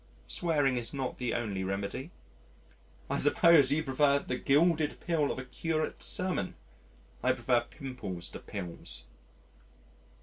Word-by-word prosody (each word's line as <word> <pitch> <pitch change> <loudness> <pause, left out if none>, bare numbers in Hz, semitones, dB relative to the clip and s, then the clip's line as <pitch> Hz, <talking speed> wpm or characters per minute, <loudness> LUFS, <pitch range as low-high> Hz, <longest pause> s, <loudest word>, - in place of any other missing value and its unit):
"Swearing 145 -7 +1
is 120 +4 -3
not 135 -2 -3
the 125 -1 -1
only 105 -6 -2
remedy." 100 - -3 1.0
"I - - -1
suppose 145 -2 +6
you 155 +2 +2
prefer 140 0 +3
the 125 - -3
gilded 155 +1 +3
pill 160 -4 +1
of - - -4
a 130 - -5
curate's 155 +5 -2
sermon: 180 - -1 0.7
I 130 - +3
prefer 120 -1 +2
pimples 125 - -6
to - - -7
pills." 85 -9 -5
135 Hz, 130 wpm, -31 LUFS, 120-155 Hz, 1.0 s, suppose